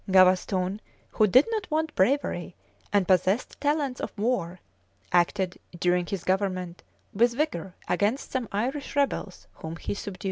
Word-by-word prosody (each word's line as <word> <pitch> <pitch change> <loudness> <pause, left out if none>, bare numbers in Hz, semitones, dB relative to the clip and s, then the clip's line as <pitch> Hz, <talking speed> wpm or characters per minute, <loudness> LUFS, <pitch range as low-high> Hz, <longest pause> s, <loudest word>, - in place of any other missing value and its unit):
[] - - -7
Gavaston, 185 +1 +4 0.3
who 215 - +3
did 255 +9 +6
not 430 -4 -2
want 315 0 0
bravery, 190 -5 +1 0.4
and 200 -3 +2
possessed 190 +8 +1
talents 290 -3 0
for - - -2
war,[] 200 -6 -1 0.5
acted, 180 +1 +1 0.2
during 180 0 +1
his 190 -2 -4
government, 185 -2 -1 0.3
with 235 +3 +3
vigor 195 - -2
against 205 +9 0
some 255 -3 -2
Irish 260 +9 -2
rebels, 275 -9 -1
whom 160 +1 -6
he 170 - -4
subdued. 200 -2 -7
200 Hz, 145 wpm, -27 LUFS, 180-255 Hz, 0.5 s, did